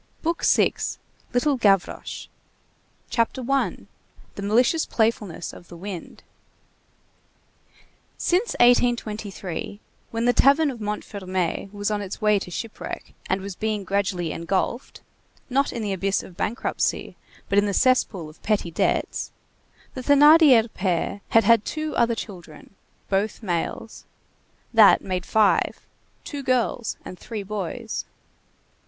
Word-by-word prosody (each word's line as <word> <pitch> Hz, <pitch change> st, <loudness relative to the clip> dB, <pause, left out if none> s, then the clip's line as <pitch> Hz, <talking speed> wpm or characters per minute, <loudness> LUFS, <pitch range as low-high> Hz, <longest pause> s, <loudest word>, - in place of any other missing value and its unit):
BOOK 335 Hz, +1 st, -1 dB
SIXTH—LITTLE 265 Hz, +3 st, 0 dB
GAVROCHE 195 Hz, -5 st, 0 dB, 0.8 s
CHAPTER 235 Hz, +2 st, 0 dB
I—THE 275 Hz, -6 st, -4 dB
MALICIOUS 240 Hz, +10 st, +2 dB
PLAYFULNESS 220 Hz, -7 st, -1 dB
OF 175 Hz, -, -13 dB
THE 175 Hz, -, -11 dB
WIND 185 Hz, -1 st, -8 dB, 1.9 s
Since 375 Hz, +7 st, +1 dB
1823, 215 Hz, -6 st, +1 dB, 0.3 s
when 230 Hz, +1 st, -2 dB
the 245 Hz, -, +4 dB
tavern 285 Hz, +3 st, +4 dB
of 235 Hz, -4 st, -9 dB
Montfermeil 195 Hz, -3 st, -3 dB
was 205 Hz, 0 st, -2 dB
on 210 Hz, -, 0 dB
the 200 Hz, -2 st, -5 dB
way 210 Hz, -2 st, +3 dB
to 185 Hz, -, -7 dB
shipwreck 220 Hz, +5 st, -6 dB, 0.2 s
and 190 Hz, +1 st, 0 dB
was 195 Hz, -1 st, -6 dB
being 215 Hz, -1 st, -2 dB
gradually 190 Hz, -4 st, -1 dB
engulfed, 190 Hz, +8 st, -2 dB, 0.5 s
not 275 Hz, +2 st, +2 dB
in 235 Hz, -, -4 dB
the 205 Hz, -2 st, -1 dB
abyss 195 Hz, +1 st, 0 dB
of -, -, -11 dB
a -, -, -17 dB
bankruptcy, 210 Hz, +6 st, -2 dB, 0.3 s
but 200 Hz, -, +3 dB
in 205 Hz, -, +1 dB
the -, -, 0 dB
cesspool 205 Hz, -7 st, +2 dB
of 155 Hz, -, -15 dB
petty 205 Hz, -5 st, 0 dB
debts, -, -, -1 dB, 0.6 s
the 260 Hz, -, -5 dB
Thénardier 285 Hz, -3 st, +7 dB
pair 185 Hz, +1 st, -1 dB
had 225 Hz, -, +5 dB
had 230 Hz, +1 st, +5 dB
two 310 Hz, +4 st, -4 dB
other 235 Hz, -1 st, +2 dB
children; 175 Hz, -7 st, -9 dB, 0.3 s
both 205 Hz, +4 st, -1 dB
males. 185 Hz, +4 st, -3 dB, 0.7 s
That 220 Hz, -3 st, +7 dB
made 185 Hz, -2 st, -3 dB
five; 215 Hz, -2 st, +2 dB, 0.4 s
two 290 Hz, -2 st, -6 dB
girls 250 Hz, -3 st, 0 dB
and 185 Hz, -, -9 dB
three 215 Hz, -3 st, -6 dB
boys. 195 Hz, -3 st, -4 dB
210 Hz, 125 wpm, -24 LUFS, 195-245 Hz, 1.9 s, Thénardier